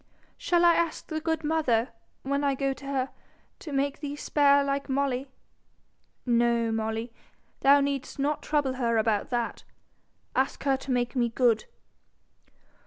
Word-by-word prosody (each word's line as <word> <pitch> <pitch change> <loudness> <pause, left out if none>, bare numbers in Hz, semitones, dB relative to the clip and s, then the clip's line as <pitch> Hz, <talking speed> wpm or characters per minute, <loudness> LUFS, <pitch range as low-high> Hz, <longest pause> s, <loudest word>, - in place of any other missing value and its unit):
'Shall 345 -1 +2
I 340 - +7
ask 335 -1 -1
the 315 -1 -4
good 320 0 -1
mother, 290 -6 +1 0.3
when 280 +1 -1
I 280 -1 +2
go 275 0 0
to 275 +1 -11
her, 270 -1 -1 0.5
to 310 - -8
make 275 0 -1
thee 290 -1 -5
spare 285 -1 +3
like 275 0 -2
Molly?' 270 -1 0 1.0
'No, 235 -1 +2
Molly, 225 +1 -3 0.5
thou 280 +1 +6
need'st 280 -1 -2
not 290 +2 -1
trouble 290 -4 0
her 230 -1 +2
about 220 -2 +1
that. 240 -2 -2 0.7
Ask 265 +1 0
her 275 -1 +3
to 265 +1 -9
make 245 -1 0
me 240 -2 +2
good.' 230 -1 +2
275 Hz, 150 wpm, -27 LUFS, 240-285 Hz, 1.0 s, I